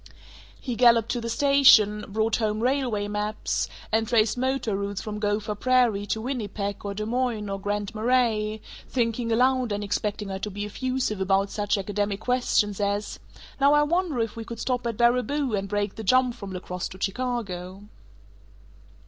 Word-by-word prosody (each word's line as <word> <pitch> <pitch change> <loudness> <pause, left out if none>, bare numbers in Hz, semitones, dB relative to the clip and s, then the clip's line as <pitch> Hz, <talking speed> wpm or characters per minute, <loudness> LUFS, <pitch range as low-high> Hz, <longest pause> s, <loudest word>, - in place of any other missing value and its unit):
He 250 -3 -4
galloped 235 -2 +5
to 240 - -1
the 230 - -4
station, 230 -5 +5
brought 220 +2 0
home 215 -2 -1
railway 250 -6 0
maps, 210 +1 -2 0.2
and 220 0 +1
traced 225 -2 +3
motor 260 -4 -1
routes 200 0 -3
from 210 -1 -5
Gopher 210 0 -1
Prairie 230 -3 +2
to 220 - -1
Winnipeg 210 -5 -4
or 200 -1 -4
Des 215 +1 -3
Moines 235 -3 -1
or 195 - -3
Grand 205 0 -2
Marais, 220 -2 +1 0.3
thinking 230 -1 -1
aloud 255 0 +2
and 205 0 -2
expecting 205 0 -2
her 190 0 -4
to 210 - -4
be 205 +1 -5
effusive 250 -1 -2
about 195 +1 +1
such 205 0 0
academic 205 0 -2
questions 220 -4 +1
as 205 +1 -2 0.4
"Now 280 +1 +5
I 295 0 +5
wonder 335 -3 0
if 225 -1 -3
we 230 - -5
could 230 0 -8
stop 250 -2 -1
at 230 -3 -3
Baraboo 250 +3 +2
and 195 -1 -1
break 205 -1 -1
the 220 - -7
jump 255 +3 +3
from 200 -4 -8
La 185 -1 -5
Crosse 180 -1 -4
to 185 - -10
Chicago?" 200 -4 -3
215 Hz, 175 wpm, -25 LUFS, 205-245 Hz, 0.4 s, galloped